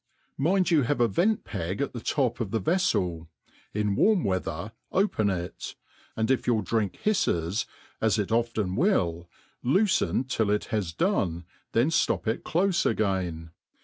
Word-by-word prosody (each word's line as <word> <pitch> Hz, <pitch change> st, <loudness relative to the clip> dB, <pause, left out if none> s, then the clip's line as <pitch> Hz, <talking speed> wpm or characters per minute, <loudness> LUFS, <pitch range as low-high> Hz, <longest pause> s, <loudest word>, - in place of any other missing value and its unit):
Mind 180 Hz, +6 st, +2 dB
you 160 Hz, -3 st, +5 dB
have 140 Hz, +2 st, 0 dB
a 120 Hz, -, +4 dB
vi^C*p<gat 135 Hz, -, -1 dB
the 120 Hz, -, -5 dB
top 125 Hz, -1 st, 0 dB
of 115 Hz, -5 st, -2 dB
the 110 Hz, +2 st, 0 dB
veflel; 95 Hz, -, 0 dB, 0.4 s
in 105 Hz, -1 st, 0 dB
warm 210 Hz, -, +3 dB
weather, 95 Hz, 0 st, -2 dB, 0.2 s
open 185 Hz, -, +1 dB
it) 90 Hz, -2 st, -4 dB, 0.4 s
aftdiJF 115 Hz, +4 st, +1 dB
your 115 Hz, -4 st, +2 dB
drink 105 Hz, +1 st, -1 dB
hifles, 100 Hz, -, +1 dB, 0.3 s
zs 110 Hz, 0 st, +2 dB
it 105 Hz, 0 st, -1 dB
often 115 Hz, -5 st, 0 dB
will, 85 Hz, -, +1 dB, 0.3 s
loofen. 170 Hz, -, +2 dB
til] 115 Hz, -4 st, 0 dB
ihbae 105 Hz, -4 st, -1 dB
done» 90 Hz, -, 0 dB, 0.3 s
Ifabn 115 Hz, +4 st, +4 dB
ftop 165 Hz, -, +1 dB
it 110 Hz, 0 st, -1 dB
clofe 180 Hz, +2 st, +1 dB
again. 90 Hz, -7 st, -1 dB
110 Hz, 140 wpm, -27 LUFS, 95-150 Hz, 0.4 s, you